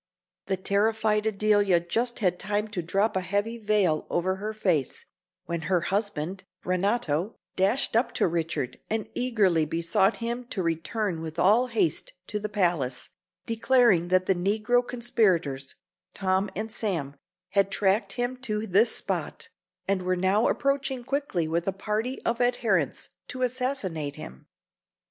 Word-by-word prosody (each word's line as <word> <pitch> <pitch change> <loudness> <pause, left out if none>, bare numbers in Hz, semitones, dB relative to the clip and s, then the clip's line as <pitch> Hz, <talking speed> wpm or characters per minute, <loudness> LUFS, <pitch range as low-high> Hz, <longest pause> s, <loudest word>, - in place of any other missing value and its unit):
The 190 -1 0
terrified 210 +2 +1
Adelia 205 -3 +3
just 230 +8 -2
had 180 -1 +1
time 210 +1 -1
to 200 -4 -3
drop 195 +6 0
a 190 - +1
heavy 205 +5 -2
veil 205 -7 +1
over 185 +2 0
her 210 +2 -4
face, 180 - -1 0.4
when 170 -1 -3
her 180 -2 +3
husband, 190 -2 -1 0.2
Renato, 185 -1 0 0.2
dashed 205 +7 +1
up 235 +3 +2
to - - +2
Richard 165 -6 -2
and 220 -1 -1
eagerly 205 -10 +2
besought 170 +6 +1
him 240 +1 -3
to 200 -6 -3
return 170 +2 -1
with 160 -1 -6
all 225 +7 +4
haste 220 -10 0 0.2
to 210 - -2
the 215 +1 -4
palace, 170 - -1 0.3
declaring 230 -6 +3
that 185 +1 +2
the 190 - +3
negro 210 +6 +1
conspirators, 185 - 0 0.4
Tom 190 +1 +1
and 215 +3 -4
Sam, 165 -12 -2 0.3
had 195 0 +2
tracked 200 +2 +1
him 245 +1 -2
to 220 -4 -3
this 215 +4 +4
spot, - - -2 0.4
and 195 -1 +1
were 185 0 0
now 190 +5 +3
approaching 275 -2 0
quickly 265 - -1
with 170 +2 -1
a - - +3
party 215 +6 -2
of 235 +1 0
adherents 225 - +1 0.2
to 255 0 -4
assassinate 240 - -2
him. 65 +1 -10
200 Hz, 145 wpm, -27 LUFS, 175-225 Hz, 0.4 s, all